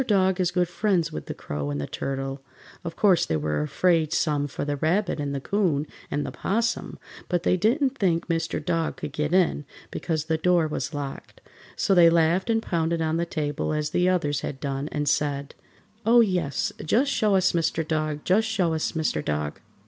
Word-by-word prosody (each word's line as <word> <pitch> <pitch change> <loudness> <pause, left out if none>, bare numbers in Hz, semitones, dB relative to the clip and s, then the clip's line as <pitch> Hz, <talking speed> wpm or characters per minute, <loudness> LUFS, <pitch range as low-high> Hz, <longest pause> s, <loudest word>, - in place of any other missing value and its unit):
Dog 190 -3 +3
is 180 -2 +2
good 180 0 +1
friends 175 -3 0
with - - -6
the - - -3
Crow 75 0 -4
and 70 0 -2
the 70 - -2
Turtle. 135 - -4 0.4
Of 165 -1 -5
course 195 -5 +4
they 80 - 0
were 75 0 -1
afraid 160 - +1
some 145 -3 +1
for 145 - -4
the 145 0 -1
Rabbit 175 +4 0
and 140 -1 -2
the - - -1
'Coon 165 -3 0 0.2
and 145 - -1
the - - -4
'Possum, 230 +3 -1 0.3
but 175 -1 0
they - - +3
didn't 260 - +1
think 170 -5 +1
Mr. 165 -1 -2
Dog 165 -1 -1
could 145 - -6
get 150 +1 -1
in, 180 -5 +2 0.3
because 160 -3 -2
the 160 0 0
door 175 -1 +3
was 150 -1 -4
locked, 140 -2 -6 0.4
so 195 - +2
they 175 -2 +7
laughed 170 +4 +2
and 225 0 +2
pounded 165 -1 0
on 160 +1 0
the 170 0 -1
table 150 -2 -2
as 150 0 -1
the 180 +1 +2
others 150 -6 0
had 135 - -5
done 140 +1 -3
and 150 -1 -2
said: 140 0 0 0.5
"Oh, 235 +2 +6
yes, 180 - 0
just 255 - +2
show 215 -6 +2
us 185 -1 +3
Mr. 165 -1 0
Dog! 155 -1 -1
Just 215 +4 +3
show 190 -7 +1
us 160 - -1
Mr. 155 - -1
Dog!" 75 -1 -2
165 Hz, 200 wpm, -25 LUFS, 145-185 Hz, 0.5 s, they